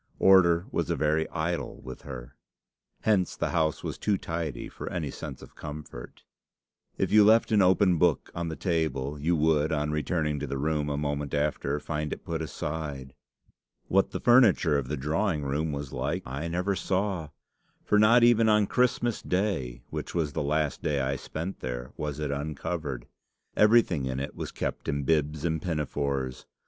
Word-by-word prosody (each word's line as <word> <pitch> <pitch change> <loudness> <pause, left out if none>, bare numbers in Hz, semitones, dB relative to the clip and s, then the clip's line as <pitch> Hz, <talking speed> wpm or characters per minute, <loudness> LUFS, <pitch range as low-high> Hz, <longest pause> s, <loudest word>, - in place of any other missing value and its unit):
Order 90 -2 +5
was - - -1
a - - +1
very 75 +1 +1
idol 85 +1 -3
with 65 0 -8
her. 65 -1 -9 0.7
Hence 100 -5 +2
the - - -2
house 80 -3 0
was - - -4
too 105 -2 +1
tidy 80 -7 -4
for - - -7
any - - -3
sense 70 -4 -8
of - - -13
comfort. 75 -5 -9 0.7
If - - 0
you 105 0 +7
left 110 +2 +5
an 105 -2 +5
open 95 -2 +4
book 85 -3 +2
on 85 0 -3
the 80 - -4
table, 75 -6 -1
you 85 +4 +1
would, 80 0 +2
on 75 -1 0
returning 75 -1 -1
to - - -4
the 70 - -3
room 75 +1 0
a 70 - -1
moment 75 -1 -2
after, 75 0 0
find 75 0 -3
it - - -6
put 80 -1 -3
aside. 75 -4 -5 0.8
What 95 +1 +3
the - - -4
furniture 120 - +5
of 70 -3 0
the 75 +3 -3
drawing 80 +3 0
room 75 +3 -1
was 70 -1 -5
like, - - -2
I 70 +6 -4
never 90 +4 -1
saw; 95 -3 -1 0.6
for 105 - +3
not 115 +3 +6
even 115 -2 +5
on 105 -1 +4
Christmas 120 0 +1
Day, 90 - -1
which - - -5
was 80 -4 0
the - - -1
last 75 0 0
day 75 -4 0
I 70 0 0
spent 80 +7 -5
there, 60 0 -5
was 75 -1 -4
it 75 -2 -2
uncovered. 70 -2 -4 0.5
Everything 105 - +4
in 65 0 -2
it 70 +1 -4
was - - -5
kept - - -4
in 70 0 -1
bibs 75 +1 0
and 80 -2 0
pinafores. 70 -5 -2
75 Hz, 180 wpm, -28 LUFS, 70-90 Hz, 0.8 s, you